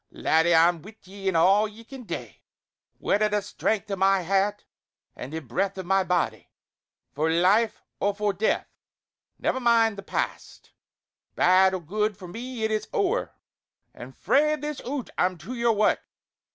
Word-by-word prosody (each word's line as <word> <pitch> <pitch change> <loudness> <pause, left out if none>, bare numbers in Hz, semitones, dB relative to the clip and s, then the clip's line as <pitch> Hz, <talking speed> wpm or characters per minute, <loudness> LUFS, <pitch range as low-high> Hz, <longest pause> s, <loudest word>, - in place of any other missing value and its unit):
Laddie, 160 +2 +2
I'm 165 0 +4
wi' 210 +5 -13
ye 195 +1 -8
in 190 - +1
all 195 +6 +4
ye 215 +2 -13
can 255 +1 -11
dae! - - -7 0.6
Wi' - - +1
a' 215 0 +1
the 210 0 0
strength 205 +1 -2
o' - - 0
my 195 0 +3
hairt 195 +3 0 0.5
an' 125 - -7
the 160 +2 -5
breath 190 - -2
o' 190 - -4
my 190 +2 +2
body; 180 -2 -1 0.6
for 155 +3 0
life 190 +7 +2 0.2
or 200 0 0
for 210 -1 0
death! 205 +4 0 0.7
Ne'er 260 - -1
mind 230 -4 +3
the - - -5
past; - - -5 0.6
bad 185 +1 +4
or 185 - -5
good 210 +5 -2
for 185 - -10
me 235 +5 -6
it 220 - 0
is 215 0 -1
ower; 435 +1 -1 0.6
and - - -11
frae 300 +2 +2
this 300 -1 -5
oot 275 -1 -4
I'm 180 0 +1
to 190 +9 -8
your 235 -2 +2
wark. 210 0 +2
200 Hz, 170 wpm, -25 LUFS, 185-225 Hz, 0.7 s, I'm